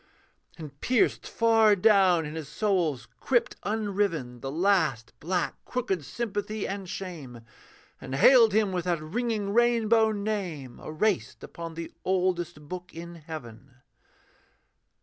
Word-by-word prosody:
And 145 -4 -10
pierced 250 -3 +1
far 225 -2 +4
down 190 -4 +4
in 150 - -6
his 160 -3 -6
soul's 160 - 0
crypt 245 -3 +1
unriven 200 - -1
The 135 - -5
last 160 - +1
black 175 0 -2
crooked 215 -10 -2
sympathy 215 - -3
and 195 -2 -5
shame, 150 -13 -7 0.6
And 130 - -5
hailed 230 - +7
him 210 -1 +2
with 180 -2 -2
that 175 -2 0
ringing 205 +4 -2
rainbow 230 -1 +3
name 195 - -4
Erased 185 +5 -1
upon 165 -1 -8
the 165 0 -6
oldest 175 -4 -1
book 180 +1 -8
in 170 +1 -8
heaven. 140 -6 -10
180 Hz, 125 wpm, -27 LUFS, 155-215 Hz, 0.6 s, hailed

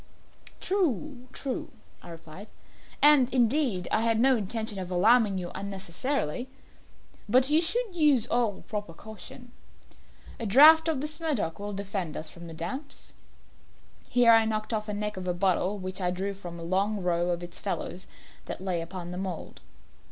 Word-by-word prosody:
"True 295 - -1
true," 270 -2 -4 0.3
I - - -12
replied; 165 +4 -10 0.6
"and, 285 -4 +7
indeed, 240 - +2
I 220 - +2
had 225 -1 +2
no 265 +2 +5
intention 220 -1 -3
of 185 -1 -5
alarming 205 +2 +4
you 175 -1 -4
unnecessarily 195 - -3 0.8
but 255 +5 +4
you 310 +2 +5
should 410 +4 -1
use 295 -8 +4
all 235 -5 0
proper 205 -6 -5
caution. 220 +5 -11 0.9
A 230 - -3
draught 310 +9 +8
of 310 -5 0
this 305 +2 -4
Medoc 265 - -2
will 205 0 -5
defend 195 -4 -4
us 155 0 -5
from 170 0 -11
the 165 - -9
damps." 230 - -6 1.0
Here 245 -1 +5
I 225 0 +6
knocked 215 +1 -2
off 215 -1 -2
the 210 - -3
neck 210 0 -3
of 185 -1 -5
a 180 - 0
bottle 190 +2 +1
which 185 0 -6
I 180 - +1
drew 190 +3 -2
from 175 -3 -9
a - - -7
long 195 +3 0
row 175 0 +1
of 175 0 -2
its 175 - -8
fellows 190 -2 -4 0.4
that - - -5
lay 185 -2 -2
upon 175 +1 -7
the 180 - -5
mould. 185 -4 -6
205 Hz, 165 wpm, -28 LUFS, 180-250 Hz, 1.0 s, draught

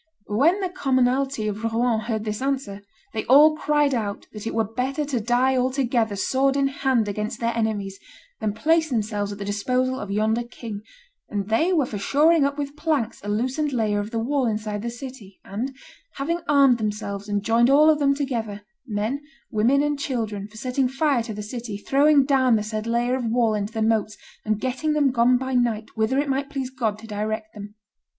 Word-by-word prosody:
"When 305 - +3
the 375 - -1
commonalty 265 -7 +1
of 210 +1 -4
Rouen 230 0 +1
heard 220 -1 -3
this 215 +2 -3
answer, 265 -7 -2 0.3
they 220 - -2
all 300 +4 +7
cried 295 -2 +1
out 210 -4 -3
that 210 0 -6
it - - -3
were 225 - +2
better 255 +7 -2
to 275 -4 -1
die 245 +4 +2
all 255 0 +2
together 240 -5 0
sword 270 +7 +1
in 275 -1 +2
hand 265 -5 +1
against 210 +2 -3
their 235 0 -1
enemies 205 -4 -2 0.4
than 210 -1 -1
place 320 +7 +2
themselves 210 -4 -1
at 200 - -6
the 200 - -5
disposal 255 +6 0
of 205 - -6
yonder 215 +3 +1
king, 230 -3 -7 0.5
and 205 -1 -3
they 315 +12 +2
were 315 -7 +3
for 210 -4 -5
shoring 300 +7 +4
up 280 +1 -1
with 285 0 -4
planks 300 -7 -1
a 205 - -5
loosened 260 +7 -1
layer 215 -4 +1
of 205 +1 -4
the 230 - -4
wall 260 +3 0
inside 210 -1 -2
the 235 - -3
city, 235 -5 -10
and, 245 +7 -4 0.4
having 335 +5 -2
armed 275 -4 +5
themselves 205 -1 -4
and 205 -1 -1
joined 230 +3 +3
all 295 +3 +6
of 310 -1 +4
them 280 -1 +3
together, 230 -7 -3 0.2
men, 220 +6 -2 0.3
women, 245 +6 +3
and 295 -1 -1
children, 220 -7 -3
for 215 +1 -15
setting 255 +3 0
fire 270 0 +1
to 230 0 -6
the 210 0 -5
city, 225 -1 -6
throwing 280 +5 +4
down 260 -4 +3
the 210 - 0
said 215 +1 -4
layer 240 +2 +1
of 255 -2 -3
wall 230 -1 +2
into 205 0 -2
the 220 -1 0
moats, 215 -1 0 0.3
and 215 -1 0
getting 265 +5 -1
them 290 -3 +3
gone 250 +1 +4
by 260 +1 -4
night 235 -3 0
whither 220 +4 +1
it 285 +1 +1
might 275 +1 -1
please 270 -3 -4
God 225 -5 -1
to 220 - -12
direct 215 +1 -4
them." 205 0 -10
240 Hz, 205 wpm, -24 LUFS, 215-275 Hz, 0.5 s, all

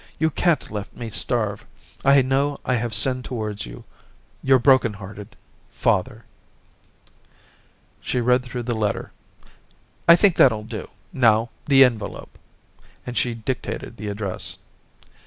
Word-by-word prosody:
You 160 0 +1
can't 170 +1 0
let 105 -1 -6
me 115 -2 -6
starve.... 105 -1 0 0.4
I 140 0 +5
know 140 +2 0
I 130 - +1
have 120 -2 -1
sinned 130 -2 +1
towards 110 - -4
you. - - -10 0.3
— - - -35
Your 135 0 +5
broken 130 -3 +4
hearted... 100 0 -10 0.3
Father/ - - -1 1.7
She 125 - -2
read 125 +1 +3
through 125 -1 -6
the 120 +1 -2
letter. 105 -2 -2 1.0
'I 170 - +10
think 185 0 +3
that'll 110 -5 +4
do; 110 0 -7 0.2
now 115 -2 +3 0.2
the 135 -2 +7
envelope,* 110 -5 -4 0.7
and 125 - -6
she 120 -1 0
dic 120 +3 -3
tated - - -7
the 105 - -6
address. 100 -2 -5
120 Hz, 140 wpm, -23 LUFS, 105-130 Hz, 1.7 s, I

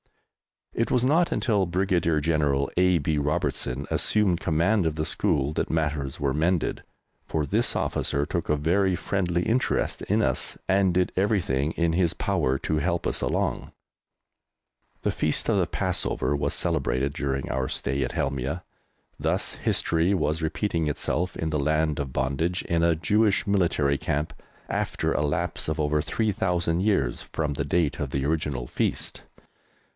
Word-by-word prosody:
It 115 - 0
was 125 -2 +2
not 160 +6 +3
until 105 -7 +1
Brigadier 85 -3 +1
General 70 -3 +1
A. 90 0 +4
B. 75 0 0
Robertson 75 -4 -1
assumed 100 -5 +2
command 85 +4 +2
of 80 - -2
the 80 0 -1
school 70 -1 +1
that - - -1
matters 75 -4 -1
were 70 -2 0
mended, 80 +3 0 0.5
for 75 -2 -1
this 70 - +1
officer 70 +1 0
took 85 +2 -3
a 75 - +4
very 90 +5 +2
friendly 90 -1 -1
interest 125 +5 0
in - - +1
us - - 0
and 95 -1 +3
did 90 0 +2
everything 90 -8 +1
in 85 -1 +1
his 85 -1 +2
power 65 +1 0
to 80 - -1
help 85 +2 -1
us - - 0
along. - - -1 1.3
The - - +1
Feast 75 - -1
of 110 - +3
the 90 -4 +2
Passover 85 -7 0
was 70 - -1
celebrated 70 +2 0
during 70 -2 -2
our 65 0 -1
stay 70 +1 -2
at 65 - -3
Helmieh. 70 +5 -2 0.6
Thus - - -1
history 85 +4 +1
was 75 -2 0
repeating 80 0 -1
itself 90 +4 -1
in 80 -1 -2
the 75 - 0
Land 75 +1 +1
of 70 -2 -3
Bondage 70 +7 -1
in 85 -1 0
a 85 -1 +3
Jewish 105 +6 +2
Military 85 -8 +1
Camp, 75 +2 -2 0.3
after - - -1
a - - 0
lapse 80 +4 -1
of 80 0 -2
over 75 0 +1
3,000 90 -5 0
years 95 - +1
from 75 -2 -3
the 70 0 -2
date 80 0 0
of 70 - -2
the 70 0 -2
original 75 -5 -1
feast. - - -2
80 Hz, 160 wpm, -26 LUFS, 75-90 Hz, 1.3 s, A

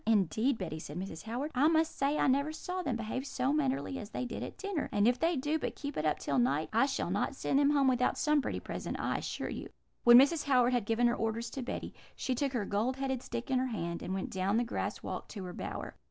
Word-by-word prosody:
"'Indeed, 220 - +2
Betty,' 160 -5 -4
said 150 0 -7
Mrs. 185 -2 -6
Howard, 250 +7 -3
'I 270 +4 +4
must 320 0 +2
say 280 +2 +1
I - - +2
never 280 +3 +2
saw 360 +4 -4
them 270 -9 -1
behave 230 +3 -3
so 270 0 0
mannerly 275 -2 0
as 210 - -7
they 250 - -3
did 245 - -5
at - - -6
dinner, 395 -6 -3
and 205 +1 +3
if 245 0 +3
they 330 +1 +2
do 295 +3 0
but - - -3
keep 285 -1 -5
it 155 - 0
up 150 - +1
till 140 -2 0
night, 140 +6 +1
I 235 +5 +4
shall 260 -10 -2
not 205 +7 0
send 270 - +1
them 285 0 +4
home 285 -2 +3
without 250 -1 +2
some 300 -1 +3
pretty - - -3
present, - - -5
I - - 0
assure - - -4
you.' - - -6 0.3
"When 240 0 +10
Mrs. 285 +4 +5
Howard 255 -3 +4
had 240 -4 0
given 230 +2 +2
her 240 0 +3
orders 225 +1 -2
to 270 - -4
Betty, 245 - -5 0.2
she 260 - -1
took 275 +2 -1
her 225 -5 0
gold 220 +6 0
headed 265 -2 -1
stick 240 +2 -5
in 260 - +3
her 260 - 0
hand, 170 -7 -3
and - - -5
went 190 - -3
down 190 +3 +1
the 240 - +3
grass 240 - -3
walk - - -5
to 200 - -7
her 180 -1 -6
bower. - - -5
250 Hz, 260 wpm, -32 LUFS, 210-280 Hz, 0.3 s, When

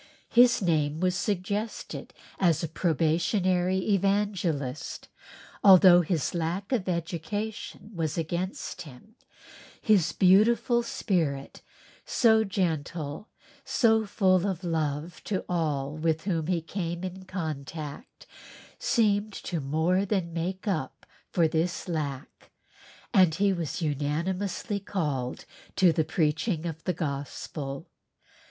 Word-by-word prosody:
His 240 -2 +5
name 155 -3 +1
was 180 0 +2
suggested 205 +2 -3 0.3
as 170 -4 +3
a - - 0
probationary 175 +3 +1 0.2
evangelist, 190 -8 -1
and - - -20
although 180 -1 +9
his 165 -3 -1
lack 175 +5 -2
of 215 -8 0
education 180 +6 -4
was 165 -3 -2
against 175 +4 -3
him, 150 - -13 0.7
his 210 -7 +3
beautiful 225 +5 +4
spirit, 165 -12 -2 0.4
so 220 -2 +4
gentle, 165 -3 -2
and - - -29
so 225 -4 +2
full 190 -2 +2
of 185 -2 -3
love 160 -1 -2
to 195 -3 -2
all 150 -6 -1
with 160 0 0
whom 165 -5 -1
he 175 -3 0
came 170 0 -4
in 185 0 -6
contact, 155 - -6 0.5
seemed 215 - +1
to 175 -3 -4
more 160 +7 +1
than 190 -4 -1
make 185 +5 -3
up 135 -8 -2 0.2
for 170 -2 +3
this 165 +4 -1
lack 145 -5 -5 0.6
and 185 -7 +5
he 195 +2 +2
was 170 -1 -3
unanimously 170 +8 -2
called 150 -11 -3 0.3
to 180 -4 +5
the 160 - +2
preaching 160 +2 0
of 165 -1 -5
the 180 - +1
Gospel. 140 -2 -5
175 Hz, 115 wpm, -28 LUFS, 155-195 Hz, 0.7 s, although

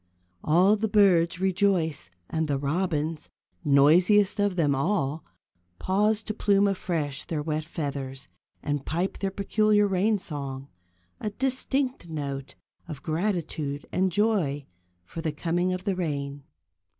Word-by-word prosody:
All 180 +7 +4
the 220 +1 -1
birds 180 -5 +4
rejoice, 185 - +1 0.2
and 160 -1 -1
the 140 -2 0
robins, 155 +1 -2 0.3
noisiest 175 +9 +4
of 205 -2 +1
them 150 -5 +2
all, 150 0 0 0.5
pause 210 +3 +1
to 215 - -4
plume 200 -1 +3
afresh 165 -7 -2
their 150 -3 -3
wet 155 0 -2
feathers, 140 -4 -5 0.4
and 145 -1 -2
pipe 175 +7 -2
their 195 - -1
peculiar 210 +2 +2
rain 200 +3 +2
song; 140 -7 -5 0.5
a 215 - -2
distinct 260 -2 -1
note 140 -3 -5 0.3
of 150 -4 -8
gratitude 160 -4 -2
and 190 0 +1
joy 175 -9 +1 0.4
for 165 - -7
the 160 -2 -1
coming 175 +4 -1
of 185 0 -3
the 195 -1 0
rain. 140 -5 -3
170 Hz, 130 wpm, -26 LUFS, 145-200 Hz, 0.5 s, All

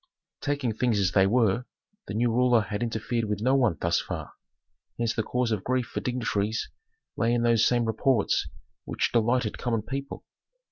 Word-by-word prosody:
Taking 140 -5 -1
things 115 0 +1
as 95 -2 +2
they 95 0 +4
were, 115 +1 +2 0.4
the - - -5
new 120 +1 +2
ruler 125 0 +4
had 105 +1 -4
interfered 115 0 -1
with 105 -2 -2
no 130 +5 +2
one 120 -10 +2
thus 85 0 +1
far, - - -6 0.6
hence 115 -1 0
the - - 0
cause 125 +2 -1
of 105 -4 -1
grief 130 -1 0
for - - -5
dignitaries 110 -4 -2 0.4
lay 115 +1 +1
in 120 - 0
those 115 -2 +4
same 120 -1 +2
reports 110 0 +1 0.4
which - - -1
delighted 120 0 +1
common 115 -3 -1
people. 135 +3 -6
115 Hz, 175 wpm, -27 LUFS, 110-125 Hz, 0.6 s, they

